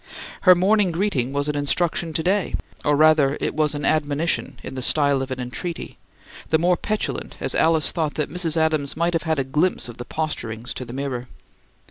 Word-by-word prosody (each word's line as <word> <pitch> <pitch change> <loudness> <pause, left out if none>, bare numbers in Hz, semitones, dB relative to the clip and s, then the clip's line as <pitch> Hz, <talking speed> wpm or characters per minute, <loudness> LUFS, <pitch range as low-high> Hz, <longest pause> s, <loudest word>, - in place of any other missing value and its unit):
Her 185 - +10
morning 195 +2 +3
greeting 165 -8 -1
was 140 +1 -1
an 150 - -1
instruction 165 +3 0
to 160 - -1
day; 190 +2 +1 0.3
or, 145 -1 +3
rather, 150 -2 +4
it - - -1
was 150 -1 +1
an 145 - -3
admonition 155 +2 0
in - - -7
the 130 - -5
style 140 0 +3
of 135 - -4
an 130 0 -4
entreaty, 165 +8 -5 0.5
the 160 - +4
more 175 +2 +3
petulant 215 +4 -3
as - - 0
Alice 160 -2 +3
thought 155 -3 -2
that 150 - -2
Mrs. 170 -2 0
Adams 155 -3 0
might 170 +1 +1
have 165 - +1
had 160 - +2
a 135 - +1
glimpse 150 +6 0
of 120 -1 -10
the 120 - -7
posturings 120 -7 -3
to 130 - -6
the 120 - -9
mirror. 130 -2 -4
155 Hz, 200 wpm, -22 LUFS, 140-170 Hz, 0.5 s, Her